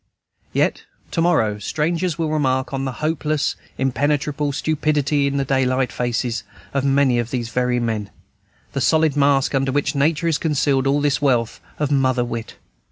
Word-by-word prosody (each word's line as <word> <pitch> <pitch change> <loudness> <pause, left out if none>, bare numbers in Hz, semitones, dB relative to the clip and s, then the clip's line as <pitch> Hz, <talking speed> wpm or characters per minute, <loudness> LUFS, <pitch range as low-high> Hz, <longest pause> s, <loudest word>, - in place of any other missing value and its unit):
Yet - - 0 0.3
to 165 - 0
morrow 115 -12 +2
strangers 165 - -1
will 160 -2 -1
remark 130 -3 0
on 135 0 -2
the 135 - -2
hopeless, 155 -2 0 0.2
impenetrable 145 +2 0
stupidity 150 -1 +1
in 140 0 -1
the 140 - 0
daylight 130 -1 +1
faces 120 -2 -2 0.3
of 140 -1 0
many 135 -3 +3
of 120 0 -2
these 120 -3 -3
very 125 0 0
men, 110 -3 -2 0.6
the 135 - -1
solid 155 +1 +3
mask 140 -1 +3
under 135 -1 +1
which 145 +3 0
Nature 155 +3 +1
has 160 -3 +1
concealed 145 -3 +1
all 140 +1 +2
this 145 -1 +1
wealth 120 -5 +1 0.2
of 150 -1 -1
mother 130 -3 +2
wit. 115 -1 -6
140 Hz, 165 wpm, -21 LUFS, 125-150 Hz, 0.6 s, many